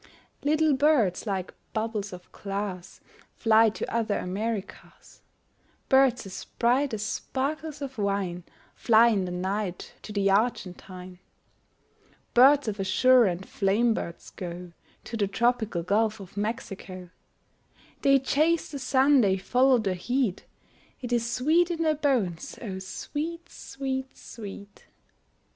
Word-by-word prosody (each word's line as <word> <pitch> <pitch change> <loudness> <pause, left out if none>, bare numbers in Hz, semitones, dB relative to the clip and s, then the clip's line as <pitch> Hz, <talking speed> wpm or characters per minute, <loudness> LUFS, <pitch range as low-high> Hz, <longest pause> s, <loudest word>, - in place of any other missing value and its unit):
Little 310 +1 +2
birds 265 - +2
like 190 -2 -3 0.2
bubbles 215 -2 -2
of 180 -1 -11
glass 195 -2 -5 0.3
Fly 225 0 +5
to 215 - -5
other 225 -3 0
Americas, 205 +2 -5 0.7
Birds 265 -4 +4
as 190 - -7
bright 255 +4 +2
as 210 - -4
sparkles 290 +5 -3
of 265 -4 -7
wine 195 -3 -1 0.3
Fly 230 0 +5
in 200 -5 +1
the 180 - -5
night 185 +1 -3
to - - -9
the 200 -1 +1
Argentine, 185 -4 -2 1.1
Birds 270 +2 +6
of 210 -1 -3
azure 240 +6 +5
and 185 0 -2
flame 215 +4 +2
birds 170 -5 -6
go 175 -1 -7 0.3
To 230 - -7
the 205 -2 +1
tropical 220 -4 0
Gulf 215 +4 +1
of 195 -2 -12
Mexico: 195 -4 -5 0.9
They 275 0 +5
chase 310 +6 +1
the 285 - -5
sun, 265 +1 +4
they 195 -3 +2
follow 250 +7 +3
the 200 -5 -1
heat, 230 +2 -1 0.5
It 245 -1 -3
is 235 0 0
sweet 315 +9 +2
in 335 -1 -1
their 310 -1 +3
bones, 250 - -1
O 195 -6 -5
sweet, 330 - -5
sweet, 265 -1 -5
sweet! 205 -2 -10
220 Hz, 130 wpm, -27 LUFS, 195-265 Hz, 1.1 s, Birds